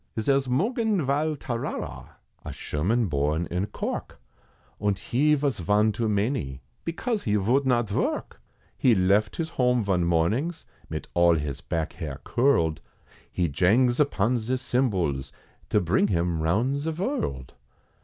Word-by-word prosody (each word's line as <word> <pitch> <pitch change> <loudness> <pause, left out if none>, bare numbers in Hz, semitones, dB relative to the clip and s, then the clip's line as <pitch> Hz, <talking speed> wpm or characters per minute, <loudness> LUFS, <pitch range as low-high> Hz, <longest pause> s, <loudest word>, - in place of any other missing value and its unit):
Zare's 135 +4 +2
Mungen 205 - +1
Val 150 +3 +1
Tarara, 120 -4 -5 0.3
A - - -6
Sherman 105 +11 0
born 75 0 0
in 90 +4 -1
Cork, - - -5 0.6
Und 100 -2 0
he 145 +10 +2
vos 140 -7 -1
von 105 +5 +3
too 115 +1 -1
many, 100 - -1 0.2
Because 215 +6 -2
he 105 -2 +2
vould 125 +7 +2
not 120 -3 +2
vork, 100 - -2 0.3
He 120 -3 +4
left 100 +3 +2
his 160 -1 -2
home 125 -4 +2
von 95 -3 +1
mornings, 105 - 0 0.2
Mit 80 0 -5
all 85 -1 +5
his 75 -2 -3
back 80 -2 -3
hair 75 -3 -6
curled, 120 - +2 0.5
He 90 - 0
jangs 115 - +3
upon 125 -4 +2
ze 125 +4 -1
cymbals, 95 - 0 0.4
To - - +3
bring 90 +4 +2
him 85 -4 0
round 110 - +1
ze 150 +3 -2
vorld. 160 - -3
110 Hz, 145 wpm, -26 LUFS, 85-135 Hz, 0.6 s, all